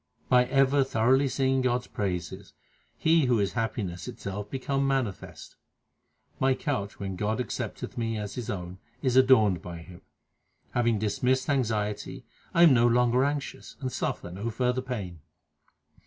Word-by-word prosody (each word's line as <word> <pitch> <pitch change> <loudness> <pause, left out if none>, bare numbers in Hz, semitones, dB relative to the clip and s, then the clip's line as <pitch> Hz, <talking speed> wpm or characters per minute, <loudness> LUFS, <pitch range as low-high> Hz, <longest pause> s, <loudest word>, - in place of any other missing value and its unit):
By 125 0 +5
ever 135 +1 +3
thoroughly 130 +3 +2
singing 130 0 +1
God 125 -1 +1
s - - -16
praises, 90 -5 -4 0.4
He 160 -2 +3
who 120 -2 +3
is 100 -1 0
happiness 100 -7 -3
itself 100 +1 -6
becometh 135 +1 -1
manifest. 130 -8 -3 0.8
My 130 0 +3
couch, 115 -9 -3
when 95 -2 -4
God 105 +5 -1
accepteth 120 0 -4
me 115 -1 -1
as 105 -1 -5
His 120 -3 -5
own, 90 -1 -5 0.2
is 130 -2 +1
adorned 110 -9 +5
by 85 -1 -7
Him. 85 +2 -12 0.7
Having 120 -2 +1
dismissed 125 +6 0
anxiety 105 -6 -2 0.3
I 170 - +5
am 160 -5 +8
no 120 -1 +5
longer 125 +1 +3
anxious, 145 0 -3
and 130 -3 -3
suffer 90 - -3
no 100 +6 -4
further 125 +2 0
pain. 105 -10 -5
120 Hz, 150 wpm, -27 LUFS, 100-130 Hz, 0.8 s, am